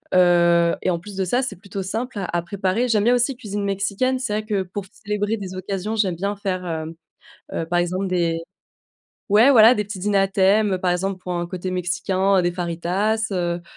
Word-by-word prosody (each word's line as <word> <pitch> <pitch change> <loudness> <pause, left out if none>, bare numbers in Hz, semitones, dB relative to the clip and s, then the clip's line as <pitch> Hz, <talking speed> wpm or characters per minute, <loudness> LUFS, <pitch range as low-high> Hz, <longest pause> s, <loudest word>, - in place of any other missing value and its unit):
Heu 170 -1 +4
et - - 0
en 170 - +1
plus 200 +2 -10
de 190 - -1
ça, 245 +8 +1
c'est 200 -7 -4
plutôt 195 +1 -6
simple 225 +4 -4
à 195 - -2
à - - 0
préparer. 200 +6 -1
J'aime 215 -3 +2
bien 240 +2 +4
aussi 245 +1 +1
cuisine 205 -4 -4
mexicaine. 200 +6 0
C'est 255 -5 -3
vrai 215 0 -2
que 205 -3 -1
pour 185 +2 -6
célébrer 210 +1 -2
des 190 -2 -7
occasions, 195 +3 -3
j'aime 190 -5 +1
bien 200 +4 -2
faire, 185 -2 -3
hem, 160 -1 -4 0.6
heu, 165 - -2
par 175 +1 0
exemple 185 +2 -1
des 170 -2 0 0.9
ouais, 220 +7 +6
voilà, 230 +1 +8
des 210 - -1
petits 200 -2 -7
dîners 200 +1 +1
à 195 0 +3
thèmes, 195 0 +3
par 180 -1 0
exemple, 185 +2 -1
pour 180 - -4
un 175 0 -2
côté 185 +1 -5
mexicain, 185 +1 +1
des 175 - +1
fajitas, 180 +5 -1
heu, 175 -2 -2
195 Hz, 210 wpm, -22 LUFS, 180-210 Hz, 0.9 s, voilà